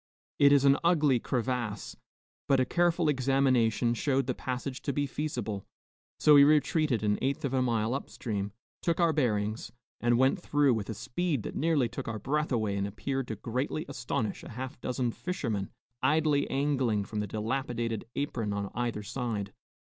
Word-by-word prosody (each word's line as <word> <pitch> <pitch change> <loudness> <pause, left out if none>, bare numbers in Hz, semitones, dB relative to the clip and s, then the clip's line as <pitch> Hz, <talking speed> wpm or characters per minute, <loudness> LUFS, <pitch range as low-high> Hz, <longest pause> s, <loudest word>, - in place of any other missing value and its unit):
It 140 -1 +7
is 140 -1 +5
an 140 0 +5
ugly 150 -7 +4
crevasse, 120 -4 -2 0.5
but 135 - +4
a 130 - +3
careful 175 0 +2
examination 130 -4 +2
showed 135 +2 +1
the 130 - -1
passage 130 +2 -4
to 140 - -1
be 145 +1 0
feasible, 120 -9 -3 0.5
so 150 - +6
we 140 -1 +9
retreated 150 - +3
an 105 -1 +1
eighth 140 +4 -1
of 135 - -2
a 130 - +2
mile 115 -2 +1
up 135 - -4
stream, 100 -4 -3 0.3
took 170 0 0
our 170 -2 +4
bearings, 110 -6 0 0.3
and 120 0 +3
went 130 +2 +3
through 145 -5 +3
with 110 -3 -3
a 110 - -3
speed 140 - -2
that - - -6
nearly 155 -5 +2
took 125 +3 -6
our 110 -1 -3
breath 150 +8 -1
away 110 -5 0
and 100 0 -1
appeared 135 +5 -3
to 110 - -3
greatly 130 - -3
astonish 125 -5 -3
a - - -10
half 130 +3 -7
dozen 125 -1 -1
fishermen 115 - -3 0.3
idly 150 -1 +2
angling 135 -7 +1
from 105 - -4
the 105 - -2
dilapidated 115 +1 -2
apron 115 -7 -2
on 100 -1 -3
either 120 -3 -2
side. 110 -3 -3
130 Hz, 175 wpm, -29 LUFS, 110-140 Hz, 0.5 s, we